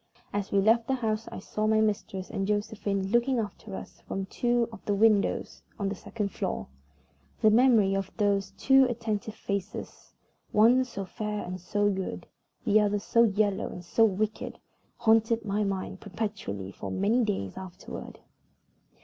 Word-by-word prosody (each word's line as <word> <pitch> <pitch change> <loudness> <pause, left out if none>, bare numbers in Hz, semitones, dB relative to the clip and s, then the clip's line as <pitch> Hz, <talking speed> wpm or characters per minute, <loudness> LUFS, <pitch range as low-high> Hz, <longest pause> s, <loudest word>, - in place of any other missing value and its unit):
As 205 -1 -2
we 200 - +4
left 225 +3 +4
the 265 - +2
house 225 -3 -2
I - - -6
saw 215 +2 -2
my 220 0 +4
mistress 205 -3 -1
and 195 0 -2
Josephine 205 -2 -1
looking 240 +2 +3
after 210 -2 -4
us - - -9
from 195 0 -3
two 240 +3 +1
of 220 - -11
the 205 - +1
windows 210 -1 +2 0.2
on 200 -1 -1
the - - -2
second 205 +1 -4
floor. - - -3 0.8
The 215 - +7
memory 220 -4 +5
of 195 -1 -2
those 200 -2 +1
two 270 0 +6
attentive 220 -3 -3
faces 200 +1 -5 0.4
one 240 +5 +5
so 200 -6 -6
fair 210 +2 -4
and 180 0 -6
so 205 +3 +1
good, 190 -1 -4 0.4
the 215 -2 +5
other 205 0 +2
so 230 +3 +3
yellow 205 -2 +1
and 180 - -8
so 225 +6 +3
wicked 215 +1 0 0.4
haunted 225 0 +3
my 205 +1 0
mind 195 -1 -3
perpetually 195 - -4
for 95 0 -7
many 210 - +2
days 195 - -2
afterward. 185 -2 -9
210 Hz, 160 wpm, -28 LUFS, 195-225 Hz, 0.8 s, The